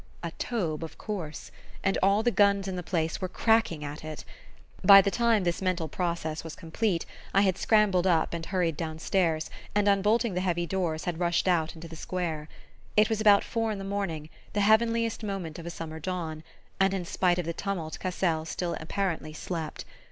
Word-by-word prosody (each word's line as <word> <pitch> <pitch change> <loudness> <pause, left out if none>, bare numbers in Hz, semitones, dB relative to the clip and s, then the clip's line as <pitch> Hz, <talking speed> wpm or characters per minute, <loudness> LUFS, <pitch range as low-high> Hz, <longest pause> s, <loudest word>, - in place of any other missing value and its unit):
A 170 - -3
Taube, 170 -10 -2
of 160 - -8
course! 180 -8 -5 0.3
And 195 - +2
all 200 +3 +4
the 240 - +3
guns 200 -2 +3
in 190 - -3
the 180 - -3
place 165 0 -1
were 185 - -1
cracking 220 -8 +2
at 145 +1 -6
it! 155 -1 -7 0.6
By 195 +1 +10
the 195 0 +2
time 230 -3 +3
this 175 +1 -1
mental 185 -3 0
process 165 -1 -2
was 165 -1 -7
complete, 170 +1 -1 0.3
I 195 - +6
had 190 -3 +3
scrambled 195 -4 +3
up 165 -3 +2
and 170 -1 -3
hurried 180 -5 0
downstairs 160 +1 -1 0.2
and, 205 0 +3
unbolting 205 +3 +3
the 180 - -1
heavy 175 -2 0
doors, 170 -4 -2
had 175 -2 -2
rushed 175 +1 +1
out 170 -3 +1
into 165 +1 -9
the 165 - -9
square. 160 -3 -3 0.5
It 215 +1 +6
was 220 -1 0
about 205 -2 +6
four 225 -1 -1
in 210 - -3
the 195 - -6
morning, 195 -6 -3 0.2
the 205 - +1
heavenliest 230 +2 +3
moment 190 -6 -4
of 170 - -8
a - - -2
summer 160 -2 -6
dawn, 160 -2 -4 0.4
and 195 0 +3
in 180 -2 -3
spite 180 0 +1
of 180 - -1
the 170 - -2
tumult 175 -4 -4
Cassel 175 -3 0
still 170 +1 -3
apparently 165 -2 -2
slept. 160 -1 -5
180 Hz, 195 wpm, -28 LUFS, 165-200 Hz, 0.6 s, By